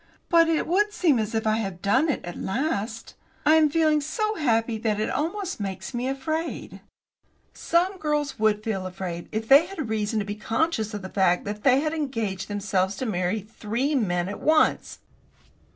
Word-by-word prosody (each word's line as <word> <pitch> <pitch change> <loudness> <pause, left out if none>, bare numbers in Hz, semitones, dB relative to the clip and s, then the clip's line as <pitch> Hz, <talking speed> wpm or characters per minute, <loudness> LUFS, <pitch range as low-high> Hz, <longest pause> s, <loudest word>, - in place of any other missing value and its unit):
"But 335 -1 +5
it 320 - +1
would 415 +5 +2
seem 325 - +2
as 220 +1 -2
if 220 - -1
I 215 0 +2
had 195 -5 -4
done 260 - +2
it 285 - -2
at 175 - -6
last. 230 -1 -3 0.3
I 310 - +6
am 315 -1 +5
feeling 310 -1 +2
so 430 +9 -1
happy 230 - 0
that 215 -2 0
it 215 - -1
almost 365 - -2
makes 190 -2 -5
me 245 +1 -2
afraid." 315 +5 -4 0.7
"Some 365 +3 0
girls 295 -4 -1
would 215 -1 +2
feel 195 -4 -2
afraid 180 -2 -6
if 220 +1 -3
they 285 +6 +7
had 320 - -5
reason 220 0 -1
to 210 - 0
be 205 - -4
conscious 225 0 -1
of 205 - -6
the 190 - -6
fact 185 -3 +2
that 205 +1 -5
they 265 0 +5
had 310 +1 -1
engaged 225 - -3
themselves 195 -2 -1
to 260 - -4
marry 185 0 -1
three 225 +7 -3
men 180 -9 0
at 200 - -6
once." 310 0 +2
225 Hz, 185 wpm, -25 LUFS, 205-310 Hz, 0.7 s, they